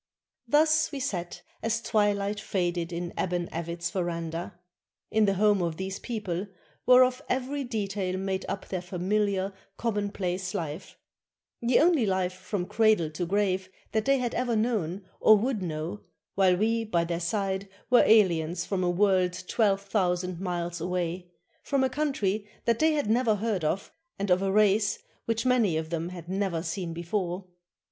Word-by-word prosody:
Thus 310 +4 +4
we 285 - -4
sat 175 -7 -4 0.2
as 225 0 0
twilight 205 -2 +1
faded 175 -4 -1
in 175 0 -4
Aban 175 -2 -1
Avit's 170 +1 -3
veranda, 170 -2 -3 0.3
— - - -59
in 220 0 +4
the 195 -1 +2
home 205 0 +3
of 165 -2 -2
these 190 +1 -4
people, 205 -5 -3 0.4
whereof 255 0 +6
every 265 +2 -1
detail 200 -6 -2
made 190 0 -2
up 195 - -4
their 185 -2 -2
familiar, 195 +2 -1 0.2
commonplace 200 -4 -2
life, 160 +1 -5 0.6
the 240 +1 +4
only 315 -9 +4
life 185 -1 0
from 185 0 -4
cradle 210 -5 +3
to 170 +3 -3
grave 190 -1 0 0.2
that 220 -1 0
they 275 0 +4
had 245 -2 -2
ever 245 -2 0
known 205 -5 -1
or 215 - +7
would 230 0 -1
know, 165 +3 -4 0.3
while 185 -2 +4
we 225 +3 +1
by 175 -6 +1
their 170 0 -2
side 195 +2 -2 0.2
were 245 - +8
aliens 175 -6 +3
from 190 -2 -1
a 180 - +2
world 185 -1 +2
twelve 200 -4 +2
thousand 180 -3 0
miles 175 -2 -3
away, 180 0 -2 0.3
from 275 -2 +1
a 260 - +2
country 215 -8 -1 0.2
that 230 -1 +2
they 315 0 +4
had 290 -6 0
never 225 0 +3
heard 205 -4 -1
of, 170 +6 -1 0.3
and 200 -1 -1
of 180 +1 +4
a 195 0 +1
race 210 0 +3 0.3
which 230 +1 -1
many 235 -10 +3
of 160 0 -4
them 165 0 -2
had 175 -2 -9
never 190 -3 -1
seen 180 -3 -3
before. 175 +2 -3
195 Hz, 165 wpm, -28 LUFS, 175-220 Hz, 0.6 s, were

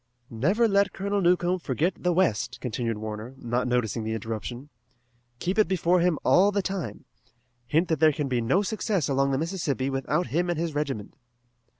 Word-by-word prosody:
"Never 185 - +2
let 200 -1 +2
Colonel 200 +1 -1
Newcomb 180 0 +2
forget 160 +4 0
the 180 - +2
west," 125 - +1
continued 115 -2 -2
Warner, 110 +4 -6
not 120 0 -1
noticing 120 -2 0
the 110 +1 -2
interruption. 115 +5 -5 0.7
"Keep 185 - -1
it 215 - +5
before 180 0 +2
him 175 -2 +2
all 200 +3 +5
the 200 -1 0
time. 190 -7 -4 0.6
Hint 160 +9 +2
that 160 -3 +1
there 155 -1 +6
can 145 -1 -2
be 125 -2 0
no 175 - +2
success 205 - -1
along 135 0 +1
the 135 - +1
Mississippi 150 -5 -1
without 140 +6 0
him 175 +2 +1
and 175 - 0
his 165 -1 -2
regiment." 135 -8 -3
155 Hz, 180 wpm, -26 LUFS, 125-180 Hz, 0.7 s, there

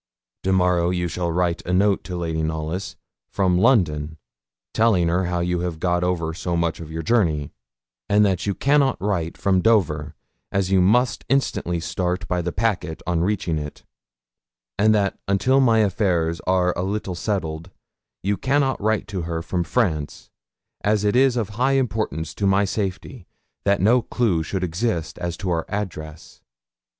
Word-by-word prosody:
Tomorrow 90 -2 +2
you 90 -1 -1
shall 85 0 -2
write 85 0 0
a 90 - -4
note 100 +2 +2
to 90 -2 -5
Lady 80 -2 -2
Knollys, 80 +4 -3 0.4
from 90 -3 +2
London, 80 - +2 0.6
telling 105 -7 +3
her 90 +2 +1
how 90 0 -1
you 90 0 0
have 85 -2 -3
got 90 0 +1
over 85 -3 -1
so 85 0 -2
much 85 -1 -1
of 80 -2 -8
your 80 +1 -4
journey, 80 -9 +1 0.6
and 105 +1 +5
that 95 -1 0
you 100 - 0
cannot 140 -1 +2
write 85 -5 -2
from 95 -2 +2
Dover, 80 -10 +1 0.4
as 95 -1 0
you 95 -1 +4
must 120 +7 +2
instantly 120 -10 0
start 90 +2 -2
by 90 -1 0
the 85 0 -3
packet 95 -6 -2
on 85 -2 0
reaching 90 -4 0
it; 75 0 -8 1.0
and 110 +1 +5
that 100 -2 0
until 100 +8 +3
my 120 -4 +4
affairs 90 -5 0
are 90 -1 +2
a - - -2
little 95 0 -2
settled, 85 -3 -3 0.5
you 100 +1 0
cannot 135 -2 +1
write 110 0 0
to 95 -2 -3
her 85 0 -3
from 90 0 -1
France, 80 - -2 0.5
as 105 0 +2
it 105 +2 +1
is 130 -1 +4
of 110 -5 -1
high 125 +6 +1
importance 110 - -1
to 100 - -1
my 95 +1 +3
safety 100 -2 -4 0.4
that 100 0 +3
no 115 +6 +4
clue 110 -8 0
should 95 +4 -3
exist 85 0 -2
as 85 -1 -3
to 95 -3 -3
our 80 -1 0
address. 80 -6 -6
90 Hz, 165 wpm, -22 LUFS, 85-105 Hz, 1.0 s, and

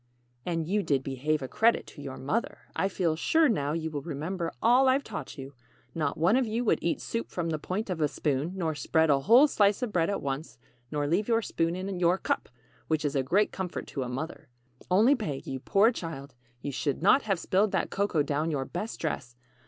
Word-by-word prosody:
] 120 0 -40
"And 165 -2 -1
you 205 +3 +1
did 140 -8 0
'behave 140 +3 -1
a - - -3
credit' 230 - +2
to 145 - -12
your 135 -2 -7
mother. 145 - -2
I 195 - +1
feel 175 -4 0
sure 320 - +3
now 150 - 0
you 160 -1 -3
will 145 -2 -3
remember 165 +3 -3
all 255 +3 +5
I've 270 +2 +2
taught 205 -5 -7
you. 135 0 -8 0.4
Not 150 -4 -1
one 170 +8 +3
of 260 -2 +2
you 230 +3 -1
would - - +3
eat 170 - 0
soup 230 - -4
from 170 -2 -3
the 155 - -2
point 195 +8 -3
of 165 -3 -3
a 150 - +4
spoon, 145 +3 -1
nor 165 -4 -1
spread 160 +2 +2
a 140 - +4
whole 235 - +6
slice 205 -3 +2
of 225 -4 -3
bread 165 0 +2
at 200 - -1
once, 140 +1 -4 0.3
nor 145 -1 -1
leave 175 +8 +1
your 230 -1 +2
spoon 165 -2 -1
in 185 0 -4
your 175 +1 +3
cup, - - -2 0.4
which 155 -1 0
is 145 - -1
a 135 - +3
great 190 +11 +2
comfort 185 -2 -4
to 140 - -4
a 125 - -3
mother. 155 +4 -5 0.4
Only 215 +9 +5
Peg, 160 - -3
you 135 - -4
poor 200 - +4
child, 145 - -7 0.3
you 145 - -3
should 140 +3 -2
not 260 +8 +6
have 200 -6 0
spilled 195 +4 +1
that - - 0
cocoa 195 -6 +1
down 150 +3 -1
your 140 -4 -1
best 195 - -5
dress. 125 -6 -3
165 Hz, 225 wpm, -28 LUFS, 145-205 Hz, 0.4 s, whole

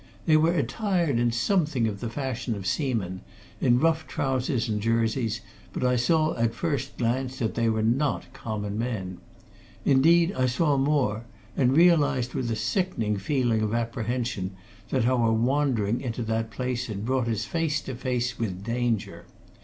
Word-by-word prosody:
They 155 - +5
were 160 +3 +4
attired 170 - 0
in 120 0 +2
something 145 - +1
of 100 -2 -4
the 115 - -4
fashion 125 -2 -3
of 100 -2 -7
seamen, 105 - -1 0.4
in 120 0 +3
rough 160 +1 +1
trousers 130 -2 -1
and 105 -2 -1
jerseys, 115 +1 0 0.3
but - - -3
I 125 0 +3
saw 155 +6 +2
at 115 -1 0
first 140 -5 -2
glance 130 +2 -1
that 110 -4 -1
they 115 -1 +1
were 110 -1 0
not 125 - 0
common 105 -4 -4
men. 100 -7 -3 0.7
Indeed, 165 +6 +5
I 130 0 +1
saw 145 +4 +2
more, 135 -6 +1 0.3
and 130 +1 +3
realized 145 -8 +4
with 125 -2 -2
a 115 - 0
sickening 115 - -1
feeling 115 +1 +1
of 110 +1 0
apprehension 115 -4 -2 0.3
that - - +1
our 120 -2 +3
wandering 120 -2 +1
into 120 -2 -3
that 110 0 -1
place 125 +2 -3
had 105 -1 -5
brought 130 -1 0
us 110 -2 -1
face 160 +2 0
to 130 - -6
face 125 -1 -2
with 95 -5 -3
danger. 115 -6 -2
120 Hz, 160 wpm, -26 LUFS, 110-135 Hz, 0.7 s, They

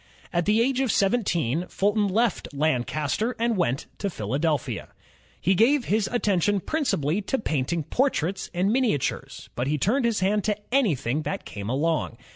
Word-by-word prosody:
At 175 -1 +1
the 215 +2 +3
age 260 +2 +1
of 265 -4 +1
seventeen, 180 - +1
Fulton 205 +1 +1
left 220 +1 +1
Lancaster 155 - 0
and 235 0 +1
went 140 -8 0
to 200 - -1
Philadelphia. 145 - -2 0.5
He 190 - +2
gave 240 +7 +3
his 215 0 +1
attention 205 -4 +1
principally 200 - 0
to 240 +6 -1
painting 155 - -1
portraits 195 - 0
and 185 +4 +1
miniatures, 240 - -1
but 125 +2 -2
he 150 +2 +1
turned 235 - +1
his 230 -4 +1
hand 205 +2 +2
to 210 -2 +1 0.2
anything 155 - +1
that 195 +5 -4
came 100 +1 -6
along. 145 -2 0
190 Hz, 155 wpm, -25 LUFS, 150-225 Hz, 0.5 s, the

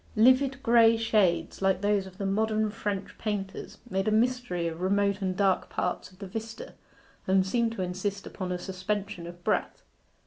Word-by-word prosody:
Livid 260 +4 +4
grey 230 -1 +6
shades, 190 -8 +1
like 190 -1 +2
those 205 -1 +1
of 185 -1 -13
the 200 - -3
modern 215 +2 +1
French 205 -2 -4
painters, 205 -3 -4
made 195 -3 -1
a - - +3
mystery 225 -6 +1
of 165 0 -5
the - - -5
remote 200 +1 +1
and 185 -1 -1
dark 195 -2 +2
parts 180 - -2
of 185 - -20
the 195 - -7
vista, 225 +4 -7 0.5
and 190 0 +4
seemed 230 +3 +1
to 190 - -3
insist 190 +2 -3
upon 185 -2 -5
a 180 - -1
suspension 190 -1 -4
of 175 0 -11
breath. - - -1
200 Hz, 180 wpm, -28 LUFS, 185-220 Hz, 0.5 s, grey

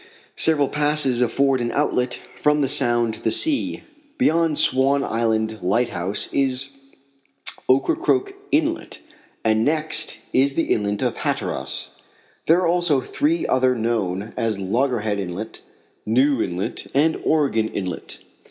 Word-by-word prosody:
Several 150 -3 +5
passes 145 -4 +1
afford 135 +2 +1
an 120 - -2
outlet 125 -4 0
from 150 0 +1
the 135 - +1
Sound 120 -5 +3
to 110 - -7
the - - 0
sea. 285 - +3 0.3
Beyond 165 - +2
Sivan 135 +2 +2
Island 110 -1 -1
lighthouse 100 -1 0
is 135 0 +1 1.0
Ocracoke 340 - +1 0.2
inlet, 315 +2 -1 0.4
and 110 0 +2
next 155 +2 0 0.2
is 135 +1 +2
the 165 - +1
inlet 105 -1 -2
of - - -1
Hatteras. - - -3 0.6
There 170 +3 +4
are - - +1
also 170 -4 +2
three 160 +5 -1
others 130 -1 +1
known 110 -3 -2
as 110 -3 -1
Logger 120 +5 -1
Head 105 -1 -2
inlet, 95 +4 -6 0.4
New 130 +3 +2
inlet, 90 0 -3
and 155 +3 +2
Oregon 140 -8 +1
inlet. 90 -5 -5
130 Hz, 130 wpm, -21 LUFS, 110-150 Hz, 1.0 s, Several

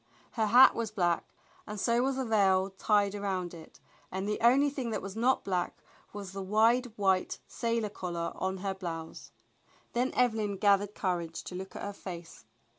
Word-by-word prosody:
Her 220 -2 0
hat 245 +5 +8
was 230 -2 -2
black 175 -5 0 0.4
and 210 -1 -5
so 235 +3 +2
was 265 +1 +1
the 265 -1 -2
veil 195 -3 +3
tied 200 +1 +2
around 190 -4 -3
it, 160 -2 -13 0.3
and 190 +2 -3
the 210 - -2
only 270 +5 +5
thing 265 -4 -3
that 215 -2 -2
was 195 +1 -6
not 245 +4 +2
black 180 -2 -2 0.3
was 200 -2 -7
the 195 0 -5
wide 225 +6 +3
white 190 -2 +1
sailor 230 -2 -1
collar 170 -4 -4
on 190 0 -2
her 195 - 0
blouse. 165 -4 -7 0.6
Then 245 +2 +1
Evelyn 220 -5 +1
gathered 200 +1 +3
courage 175 -4 -2
to - - -8
look 190 +1 -7
at - - -6
her 205 - -4
face. 175 -4 -9
200 Hz, 180 wpm, -30 LUFS, 185-225 Hz, 0.6 s, hat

